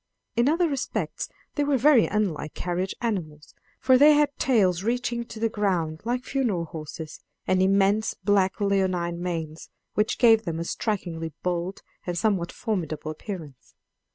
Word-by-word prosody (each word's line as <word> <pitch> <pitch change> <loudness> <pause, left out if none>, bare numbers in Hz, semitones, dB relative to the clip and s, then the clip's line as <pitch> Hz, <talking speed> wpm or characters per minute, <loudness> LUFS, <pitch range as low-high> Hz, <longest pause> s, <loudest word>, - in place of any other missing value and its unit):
In 240 +4 +3
other 335 +3 +3
respects 275 -4 -3 0.2
they 290 - 0
were 285 -1 +2
very 260 -1 +5
unlike 185 -8 -2
carriage 180 +2 -2
animals, 160 -10 -4 0.3
for 255 -1 +5
they 300 +2 +8
had 290 -1 +2
tails 190 -9 +3
reaching 235 +2 -1
to 225 -1 -9
the 225 - +2
ground, 180 -7 -1
like 245 +1 -1
funeral 230 -13 -1
horses, 155 -1 -8 0.3
and 185 0 +2
immense 195 +3 +3
black 195 -1 +1
leonine 185 -4 0
manes, 165 -3 -4 0.2
which 210 0 +1
gave 225 -2 +5
them 165 -4 -3
a - - -1
strikingly 170 -5 -3
bold 180 +1 -2 0.2
and 175 -1 -2
somewhat 190 -4 +1
formidable 160 -8 -3
appearance. 155 - -9
195 Hz, 150 wpm, -26 LUFS, 170-230 Hz, 0.3 s, they